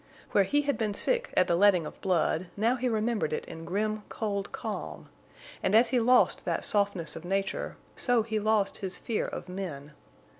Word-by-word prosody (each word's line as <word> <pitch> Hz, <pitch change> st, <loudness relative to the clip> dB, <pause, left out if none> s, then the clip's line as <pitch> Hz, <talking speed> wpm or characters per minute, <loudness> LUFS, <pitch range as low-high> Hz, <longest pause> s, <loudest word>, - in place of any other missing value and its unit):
Where 200 Hz, -, +4 dB
he 290 Hz, +7 st, +1 dB
had 285 Hz, -1 st, -1 dB
been 210 Hz, -3 st, -1 dB
sick 485 Hz, -, 0 dB
at 185 Hz, -, +6 dB
the 170 Hz, -, +2 dB
letting 185 Hz, -3 st, +4 dB
of -, -, -9 dB
blood, 180 Hz, -1 st, +1 dB
now 230 Hz, +4 st, +2 dB
he 255 Hz, 0 st, -1 dB
remembered 220 Hz, -6 st, 0 dB
it -, -, -3 dB
in 165 Hz, 0 st, -9 dB
grim, 215 Hz, +4 st, -1 dB
cold 200 Hz, -2 st, -3 dB
calm. 80 Hz, -, -6 dB, 0.5 s
And 195 Hz, -, +2 dB
as 230 Hz, +2 st, +6 dB
he 255 Hz, -, +2 dB
lost 250 Hz, +2 st, +4 dB
that -, -, -1 dB
softness 200 Hz, -7 st, 0 dB
of 165 Hz, -, -8 dB
nature, 195 Hz, +2 st, -2 dB, 0.2 s
so 245 Hz, -3 st, +2 dB
he 220 Hz, -1 st, -2 dB
lost 210 Hz, -1 st, +1 dB
his 190 Hz, -2 st, -4 dB
fear 225 Hz, -, -2 dB
of -, -, -6 dB
men. 160 Hz, -6 st, -6 dB
205 Hz, 190 wpm, -29 LUFS, 180-225 Hz, 0.5 s, at